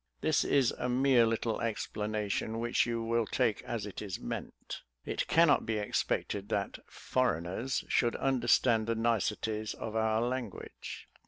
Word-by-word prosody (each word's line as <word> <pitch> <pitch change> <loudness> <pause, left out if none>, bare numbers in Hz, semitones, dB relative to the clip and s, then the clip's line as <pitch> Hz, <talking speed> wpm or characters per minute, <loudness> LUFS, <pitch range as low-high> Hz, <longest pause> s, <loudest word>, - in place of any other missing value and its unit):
This 155 -1 +3
is 135 -4 +3
a 125 - -1
mere 125 -2 +4
little 115 0 -1
explanation, 105 -1 -2
which 120 +1 +1
you 115 -1 -1
will 115 -1 +1
take 115 -5 +1
as 115 -3 -4
it 105 - -7
is 100 -4 -5
meant. - - -6 0.2
It - - -2
cannot 165 -3 +5
be 110 -1 -1
expected 105 -1 -1
that - - -2
'foreigners' 120 +1 -1
should 120 -1 +2
understand 120 -3 +3
the 115 - +1
niceties 110 -1 0
of 110 0 -6
our 110 0 +2
language." 125 -4 -5
115 Hz, 145 wpm, -31 LUFS, 110-125 Hz, 0.2 s, cannot